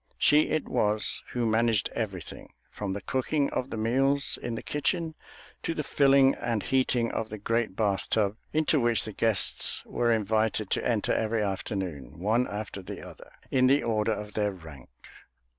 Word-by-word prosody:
She 150 Hz, +1 st, +4 dB
it 155 Hz, -1 st, -1 dB
was 105 Hz, 0 st, +2 dB
who 120 Hz, -1 st, 0 dB
managed 110 Hz, -1 st, +2 dB
everything, 100 Hz, -6 st, -5 dB, 0.2 s
from 100 Hz, -2 st, -4 dB
the 100 Hz, -, -6 dB
cooking 140 Hz, +2 st, 0 dB
of 130 Hz, -, -2 dB
the -, -, -5 dB
meals 135 Hz, +5 st, +2 dB
in 120 Hz, -1 st, -3 dB
the -, -, -6 dB
kitchen 160 Hz, +3 st, -1 dB, 0.5 s
to 165 Hz, -, -3 dB
the 150 Hz, -, -2 dB
filling 135 Hz, -1 st, +4 dB
and 115 Hz, -3 st, -2 dB
heating 125 Hz, -3 st, +1 dB
of 110 Hz, -, -3 dB
the 110 Hz, -, -6 dB
great 115 Hz, 0 st, -1 dB
bath 100 Hz, -3 st, 0 dB
tub 105 Hz, -2 st, +1 dB, 0.2 s
into 155 Hz, -1 st, +2 dB
which 120 Hz, -3 st, +3 dB
the 110 Hz, -, -7 dB
guests 110 Hz, -3 st, +3 dB
were 120 Hz, -1 st, 0 dB
invited 110 Hz, -1 st, 0 dB
to -, -, 0 dB
enter 115 Hz, -4 st, 0 dB
every 110 Hz, 0 st, 0 dB
afternoon, 95 Hz, -, -4 dB
one 110 Hz, +8 st, +1 dB
after 105 Hz, -1 st, -6 dB
the 90 Hz, -, -8 dB
other, -, -, -14 dB, 0.2 s
in 130 Hz, -1 st, +4 dB
the 140 Hz, +2 st, +3 dB
order 110 Hz, -1 st, +1 dB
of 105 Hz, 0 st, -7 dB
their 105 Hz, -1 st, 0 dB
rank. 80 Hz, -8 st, -12 dB
110 Hz, 175 wpm, -28 LUFS, 105-130 Hz, 0.5 s, She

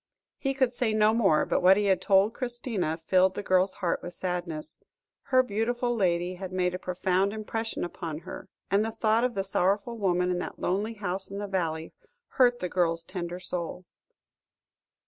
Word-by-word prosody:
He 270 Hz, -1 st, -1 dB
could 260 Hz, -2 st, +2 dB
say 240 Hz, -3 st, 0 dB
no 215 Hz, 0 st, +4 dB
more, 195 Hz, -10 st, +3 dB
but -, -, 0 dB
what 185 Hz, +2 st, +7 dB
he 210 Hz, -, +1 dB
had 190 Hz, -2 st, +2 dB
told 200 Hz, +2 st, +4 dB
Christina, 235 Hz, -10 st, -2 dB
filled 185 Hz, +3 st, +2 dB
the 205 Hz, -, -4 dB
girl's 185 Hz, 0 st, +2 dB
heart 170 Hz, -, 0 dB
with 175 Hz, 0 st, -7 dB
sadness; 175 Hz, -4 st, -4 dB, 0.5 s
her 255 Hz, -2 st, +4 dB
beautiful 240 Hz, +2 st, -1 dB
lady 180 Hz, -3 st, +1 dB
had 185 Hz, 0 st, -7 dB
made 180 Hz, -1 st, 0 dB
a 180 Hz, -, -4 dB
profound 185 Hz, +2 st, 0 dB
impression 225 Hz, +1 st, -3 dB
upon 165 Hz, -3 st, -5 dB
her, -, -, -9 dB, 0.2 s
and 200 Hz, +2 st, +4 dB
the 225 Hz, -, -1 dB
thought 220 Hz, +1 st, +1 dB
of 250 Hz, -1 st, 0 dB
the 195 Hz, -, 0 dB
sorrowful 200 Hz, +4 st, 0 dB
woman 180 Hz, -2 st, +1 dB
in 175 Hz, -, -1 dB
that -, -, -5 dB
lonely 210 Hz, +5 st, -1 dB
house 190 Hz, -2 st, -3 dB
in 200 Hz, -, -6 dB
the 205 Hz, -, -3 dB
valley, 165 Hz, -5 st, -2 dB, 0.4 s
hurt 245 Hz, -2 st, +4 dB
the 180 Hz, -, -3 dB
girl's 170 Hz, -2 st, 0 dB
tender 175 Hz, -1 st, -5 dB
soul. 180 Hz, 0 st, -4 dB
190 Hz, 185 wpm, -28 LUFS, 180-220 Hz, 0.5 s, what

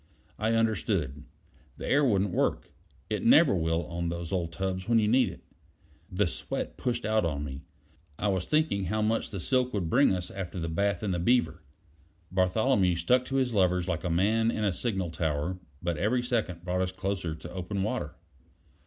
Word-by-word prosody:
I 110 Hz, +2 st, +1 dB
understood: 85 Hz, -10 st, 0 dB, 0.5 s
the -, -, -6 dB
air 145 Hz, +2 st, +4 dB
wouldn't 100 Hz, -7 st, +2 dB
work; -, -, 0 dB, 0.4 s
it -, -, -2 dB
never -, -, +6 dB
will 80 Hz, -1 st, 0 dB
on 85 Hz, 0 st, -3 dB
those 85 Hz, -1 st, -5 dB
old 85 Hz, -4 st, -1 dB
tubs 95 Hz, +3 st, -3 dB
when 115 Hz, -, +5 dB
you 110 Hz, -2 st, +3 dB
need 125 Hz, +4 st, +4 dB
it. -, -, -11 dB, 0.7 s
The 100 Hz, +3 st, +2 dB
sweat 85 Hz, -, -4 dB
pushed 120 Hz, -1 st, -2 dB
out 110 Hz, 0 st, +2 dB
on 75 Hz, -4 st, -1 dB
me. 70 Hz, -1 st, -6 dB, 0.6 s
I 105 Hz, -, 0 dB
was 95 Hz, -2 st, -1 dB
thinking 155 Hz, -9 st, +2 dB
of 95 Hz, -, -3 dB
how 110 Hz, +3 st, 0 dB
much 110 Hz, +1 st, 0 dB
the 100 Hz, -, -5 dB
silk 125 Hz, +5 st, +1 dB
would 85 Hz, -5 st, -2 dB
bring 140 Hz, +4 st, +5 dB
us 90 Hz, -1 st, -4 dB
after 95 Hz, -2 st, -5 dB
the 85 Hz, 0 st, -3 dB
bath 100 Hz, +3 st, 0 dB
in 100 Hz, -, 0 dB
the 90 Hz, -, -1 dB
Beaver. 85 Hz, -5 st, +2 dB, 0.7 s
Bartholomew 95 Hz, +1 st, +2 dB
stuck 125 Hz, +10 st, +2 dB
to 135 Hz, -, -4 dB
his 130 Hz, -3 st, +1 dB
levers 90 Hz, -3 st, +2 dB
like 85 Hz, -3 st, -2 dB
a 90 Hz, -, -1 dB
man 110 Hz, +7 st, +2 dB
in 110 Hz, -, -1 dB
a 100 Hz, -3 st, +2 dB
signal 95 Hz, -4 st, -2 dB
tower, 80 Hz, +2 st, -2 dB, 0.2 s
but 85 Hz, -2 st, -1 dB
every 120 Hz, +6 st, +1 dB
second 110 Hz, -9 st, -2 dB
brought 90 Hz, 0 st, 0 dB
us 95 Hz, 0 st, -1 dB
closer 95 Hz, -3 st, -3 dB
to 80 Hz, +2 st, -10 dB
open 95 Hz, +2 st, -3 dB
water. 110 Hz, -, -3 dB
95 Hz, 195 wpm, -28 LUFS, 85-110 Hz, 0.7 s, never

